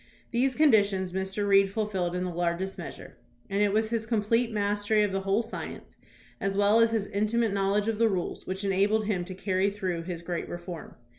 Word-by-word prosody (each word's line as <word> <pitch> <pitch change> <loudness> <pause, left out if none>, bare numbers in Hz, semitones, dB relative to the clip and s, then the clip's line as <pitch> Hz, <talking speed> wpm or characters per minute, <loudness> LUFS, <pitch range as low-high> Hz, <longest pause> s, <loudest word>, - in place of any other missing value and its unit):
These 255 +2 +1
conditions 200 - +3
Mr. 190 +2 -2
Reed 195 -1 +5
fulfilled 195 -4 -2
in 180 - -1
the 180 -1 -3
largest 175 +3 -1
measure, - - -9 0.3
and 200 +1 +1
it 205 -1 +3
was 220 +2 +1
his 225 -1 -1
complete 230 +1 +1
mastery 205 0 +1
of 205 - 0
the 195 - -1
whole 195 +4 +1
science, 225 - -8 0.4
as 195 0 -1
well 205 +2 +4
as 230 0 +5
his 225 -3 0
intimate 215 +2 0
knowledge 200 +1 +1
of 225 -1 -1
the 230 -1 +4
rules, 185 -4 -3
which 190 +2 -3
enabled 200 +3 +2
him 195 -4 0
to 185 0 -7
carry 190 +1 +1
through 185 -4 -3
his 170 0 -6
great 175 0 -4
reform. 175 -2 -7
200 Hz, 200 wpm, -28 LUFS, 190-220 Hz, 0.4 s, Reed